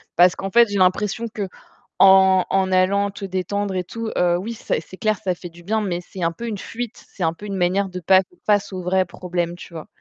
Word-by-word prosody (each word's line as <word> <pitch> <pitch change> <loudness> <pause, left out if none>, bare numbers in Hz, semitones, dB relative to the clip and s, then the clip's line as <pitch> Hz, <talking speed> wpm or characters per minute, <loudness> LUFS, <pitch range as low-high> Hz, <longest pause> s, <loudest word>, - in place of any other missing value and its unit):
Parce 175 +1 +5
qu'en 195 - -4
fait, 235 +3 +5
j'ai 200 -1 -1
l'impression 195 +4 +1
qu'en 190 -2 +3
en 190 -1 +1
allant 200 +2 +2
te 200 0 -7
détendre 195 +1 -2
et 185 - -1
tout, 230 +5 -5
heu, 175 -1 +3
oui, 215 +6 -4
c'est 185 - -2
c'est 185 +3 -13
clair, 215 0 +1
ça 185 -2 0
fait 175 +1 -9
du 170 +1 -16
bien 220 +4 0
mais 180 -4 -2
c'est 180 +1 -8
un 165 - +2
peu 235 +8 -7
une 215 -3 -3
fuite. 235 +3 -7
C'est 190 - -6
un 165 0 +1
peu 205 - -11
une 200 -1 -4
manière 190 +2 +1
de 180 0 -6
pas 190 +2 +5
faire 355 - -20
face 205 -2 +2
au 185 - -4
vrai 185 +1 +1
problème, 175 -1 -3
tu 175 0 -12
vois? 160 - -7
190 Hz, 245 wpm, -22 LUFS, 180-205 Hz, -, Parce